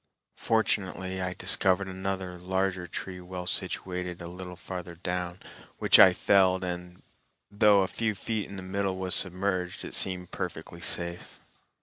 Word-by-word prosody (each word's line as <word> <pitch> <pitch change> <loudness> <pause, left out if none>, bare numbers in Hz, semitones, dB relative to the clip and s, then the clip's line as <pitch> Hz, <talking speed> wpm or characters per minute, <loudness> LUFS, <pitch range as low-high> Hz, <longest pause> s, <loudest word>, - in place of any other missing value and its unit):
Fortunately, 95 -4 0
I 90 0 -3
discovered 95 +2 +3
another 95 -1 -4
larger 95 0 -1
tree 90 +2 -6
well 90 0 -6
situated 90 0 -3
a 85 - -7
little 90 +1 -8
farther 90 0 -7
down, 90 +1 -4 0.4
which - - +5
I 95 - +10
felled, 95 0 +3
and 90 0 -6 0.5
though 105 -1 +5
a - - -1
few 110 0 -2
feet 105 +2 -3
in 100 - -8
the 95 - -7
middle 95 0 -2
was 95 -1 0
submerged, 95 -1 0
it - - -8
seemed 90 -1 0
perfectly 85 -1 -6
safe. 85 +1 0
95 Hz, 145 wpm, -28 LUFS, 90-95 Hz, 0.5 s, I